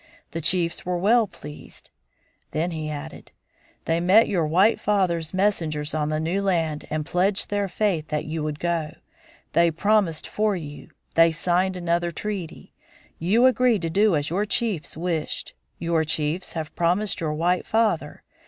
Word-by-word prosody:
The 165 - -4
chiefs 170 +1 +1
were 180 0 -1
well 220 +5 +3
pleased." 150 -5 -11 0.6
Then 165 +3 -1
he 155 -2 -4
added, 150 +1 -8 0.5
"They 165 +1 +1
met 190 +6 +5
your 170 -6 0
white 190 +8 +4
father's 175 -6 0
messengers 165 -7 0
on 150 -1 -1
the 155 0 -1
new 170 +5 -1
land 165 -6 0
and 155 -1 -2
pledged 190 +5 0
their 205 -1 0
faith 185 -6 -1
that 150 -1 -2
you 155 +1 -3
would 150 0 -3
go. 165 -3 -2 0.6
They 170 +1 +4
promised 185 -1 +1
for 210 -1 0
you. 150 -4 -8 0.2
They 165 0 +5
signed 180 +3 0
another 175 0 0
treaty. 190 -1 -6 0.5
You 210 +9 +3
agreed 250 -6 +3
to 165 - -1
do 205 +1 +3
as 145 +1 -1
your 195 +4 +1
chiefs 215 -9 -1
wished. 165 -2 -2 0.2
Your 165 -1 0
chiefs 155 +3 -2
have 160 -1 -5
promised 180 +5 +1
your 155 -2 -1
white 175 +3 0
father. 225 0 0
170 Hz, 160 wpm, -24 LUFS, 155-195 Hz, 0.6 s, met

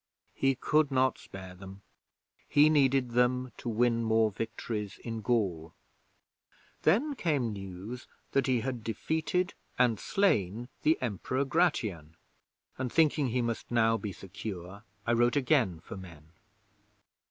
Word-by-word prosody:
He 135 0 +2
could 150 +3 +2
not 130 -1 +2
spare 95 -1 -10
them. 95 +1 -11 0.7
He 150 +1 +6
needed 135 -4 +3
them 125 +1 +2
to 120 - -5
win 115 +1 +2
more 110 -1 +3
victories 105 -1 -4
in 115 -2 -4
Gaul. 95 -8 -1 1.1
'Then 235 - +3
came 145 - 0
news 100 +5 -7 0.2
that 135 0 +2
he 125 -3 +2
had 125 -2 -4
defeated 160 - -1 0.2
and 120 -4 +3
slain 120 - +1
the 155 - +3
Emperor 130 +4 -1
Gratian, 110 - 0 0.6
and 130 -2 -2
thinking 155 -3 +3
he 125 +1 0
must 115 -1 -3
now 115 -1 +3
be 105 -2 -4
secure, 95 +1 -7 0.2
I 120 - +2
wrote 120 +2 +3
again 130 - +2
for - - -9
men. 80 -4 -12
120 Hz, 130 wpm, -30 LUFS, 100-135 Hz, 1.1 s, He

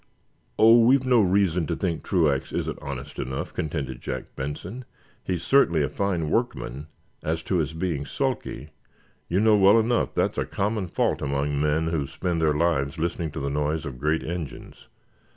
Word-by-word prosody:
"Oh, 115 +2 +7
we've 130 +3 +4
no 125 -3 +5
reason 90 -4 +2
to - - -1
think 85 -4 -2
Truax 80 -8 +1
isn't - - -3
honest - - -7
enough," 65 +1 -4
contended 70 -5 -3
Jack - - -6
Benson. 85 - -5 0.4
"He's 90 -3 -2
certainly 85 - +4
a 70 - -1
fine 90 -5 -1
workman. 75 - -2 0.3
As 80 +1 -2
to 95 - 0
his 80 -1 -1
being 80 -5 -2
sulky, 75 +3 -3 0.6
you 90 - +2
know 110 0 +5
well 100 +3 +6
enough 115 +2 0
that's - - 0
a - - 0
common 100 -1 -1
fault - - 0
among 70 +1 -1
men 75 +2 +1
who 75 -4 -1
spend 85 0 -2
their 75 -2 +2
lives 80 -2 +1
listening 85 0 -2
to - - -4
the 70 0 -2
noise 75 +2 -1
of 65 -4 -7
great 75 +3 0
engines. 85 -4 -7
80 Hz, 170 wpm, -25 LUFS, 75-95 Hz, 0.6 s, Oh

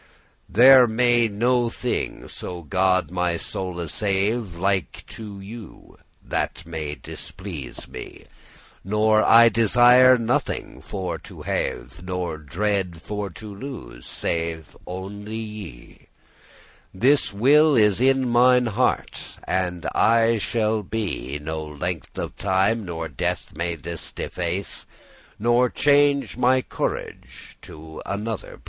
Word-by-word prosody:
"There 125 +4 +8
may 120 +1 +3
no 120 +3 +1
thing, - - -3
so 90 -1 -7
God 95 -1 +1
my 90 -2 0
soule 90 -1 -4
save, 100 +1 -1
*Like 95 0 -1
to* 105 -3 -9
you, 105 +2 -11 0.3
that - - -3
may 80 -3 -5
displease 85 -10 -8
me: - - -9
*be - - -8
pleasing* - - -17 0.6
Nor 110 +2 +3
I 115 +1 +7
desire 120 +3 +6
nothing 115 -1 -2
for 95 -2 -4
to - - -12
have, - - -3
Nor 90 -3 -3
dreade 95 +2 -2
for 105 +2 -4
to 105 +4 -10
lose, 100 - -9
save 80 -2 -3
only 100 +4 -6
ye: 105 - -9 0.8
This 135 +9 +2
will 145 +8 +5
is 105 -1 +4
in 135 0 +3
mine 125 +1 +5
heart, 120 +3 0 0.2
and 90 -2 -2
aye 115 0 +3
shall 110 +2 0
be, 95 - -3
No 80 +1 -4
length 75 +3 -5
of - - -4
time, 100 +3 +1
nor 85 -2 -4
death, 70 -5 -3
may 85 +2 -2
this 85 +2 -7
deface, 90 +2 -4 0.5
Nor 120 +3 +3
change 145 -1 +2
my 130 +1 +3
corage* - - -5
to 80 0 -11
another 105 +1 -4
place." - - -24
100 Hz, 125 wpm, -23 LUFS, 85-115 Hz, 0.8 s, There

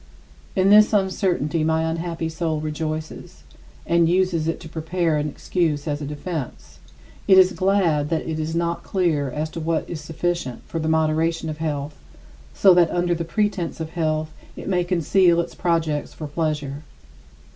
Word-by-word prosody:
In 190 +1 +3
this 210 +1 +7
uncertainty 185 -5 +1
my 160 0 +1
unhappy 165 0 -2
soul 160 -1 -2
rejoices, 155 0 -5 0.4
and 170 -1 +3
uses 180 -3 +1
it 165 - -1
to - - -9
prepare 160 0 -1
an 150 0 -1
excuse 155 -2 -1
as 145 0 -2
a 145 - -4
defense. 150 -1 -6 0.5
It 190 -2 +7
is 185 0 +7
glad 175 -5 +1
that 165 -1 -1
it 160 -1 -3
is 160 +1 -3
not 170 0 -1
clear 165 -7 0
as 150 +4 -3
to - - -6
what 160 0 -1
is 160 -3 -6
sufficient 160 -4 -3
for 165 - -4
the 160 0 -1
moderation 160 +1 +1
of 150 - -8
health, 145 -2 -3 0.6
so 190 -2 +5
that 175 -2 +4
under 175 0 +1
the 170 0 -2
pretense 190 0 -1
of 160 0 -5
health 155 -2 -1 0.2
it - - -8
may 180 -2 +1
conceal 175 0 +3
its 170 - -2
projects 165 -4 -1
for 155 - -6
pleasure. 150 -2 -2
165 Hz, 165 wpm, -23 LUFS, 155-175 Hz, 0.6 s, this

